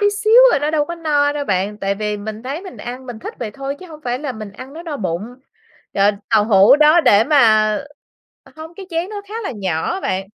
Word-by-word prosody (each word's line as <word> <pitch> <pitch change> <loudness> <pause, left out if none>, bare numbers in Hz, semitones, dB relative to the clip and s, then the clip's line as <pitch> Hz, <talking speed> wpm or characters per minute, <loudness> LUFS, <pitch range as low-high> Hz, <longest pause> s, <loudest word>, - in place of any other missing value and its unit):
tí 410 0 +3
xíu 435 +4 +4
à, - - +3
nó 295 +2 -1
đâu 300 -2 +1
có 340 - -6
no 295 -3 +1
đâu 290 -1 -3
bạn. 195 +1 -1
Tại 195 0 -1
vì 210 0 -3
mình 215 +2 -7
thấy 280 +6 -5
mình 375 - -10
ăn, 250 +2 -8
mình 240 -3 -7
thích - - -8
vậy 230 -3 -4
thôi 275 +5 -6
chứ 370 - -10
hông 310 -2 -12
phải 245 0 -2
là 285 -2 -4
mình 215 -3 -9
ăn 255 +6 -11
nó 330 - -9
no 315 -4 -5
bụng. 195 +4 -4 0.6
Trời, 200 +1 +3 0.2
tàu 215 -2 +4
hủ 210 +4 +6
đó 305 +3 +5
để 210 -6 +4
mà 220 -7 +4 0.7
ờ, - - -19
không 320 +2 -10
cái 385 0 -10
chén 335 +3 -2
nó 410 -1 -6
khá 425 - -9
là - - -3
nhỏ 180 -5 -2
á 385 - -4
bạn. 190 +1 -2
260 Hz, 255 wpm, -18 LUFS, 210-315 Hz, 0.7 s, hủ